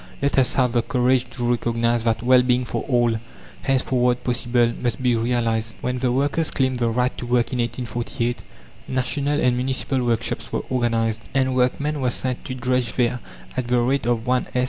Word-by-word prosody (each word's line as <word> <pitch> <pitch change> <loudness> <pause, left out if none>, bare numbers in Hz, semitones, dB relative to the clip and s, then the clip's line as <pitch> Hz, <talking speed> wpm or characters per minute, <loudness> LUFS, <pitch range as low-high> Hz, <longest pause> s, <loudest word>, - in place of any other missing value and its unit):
Let 140 -1 +2
us 130 -2 +2
have 125 -2 +2
the 120 - +2
courage 125 +1 +1
to 120 0 -3
recognise 115 -1 0
that 115 0 0
Well 125 +1 +6
being 125 0 +1
for - - -3
all, 120 -3 +2 0.4
henceforward 125 -2 +1
possible, 120 -1 +2
must 125 +2 -2
be 125 -2 +3
realized. 115 -1 0
When 125 0 -2
the 125 -1 +1
workers 145 +5 +1
claimed 130 -1 0
the 120 -1 +1
right 125 +2 0
to - - -5
work 120 +1 +1
in 125 - -1
1848, 120 0 -2 0.5
national 140 +3 -1
and 125 -3 +2
municipal 130 +1 -1
workshops 120 -2 -1
were - - -2
organized, 115 -3 0
and 130 -1 +2
workmen 140 +4 0
were 125 - +2
sent 125 +1 -2
to 130 - -4
drudge 125 -2 0
there 125 0 +1 0.4
at 130 -2 -2
the 125 0 +2
rate 125 +1 +1
of 120 -2 +1
1s. 125 0 +1
125 Hz, 185 wpm, -22 LUFS, 120-130 Hz, 0.5 s, Well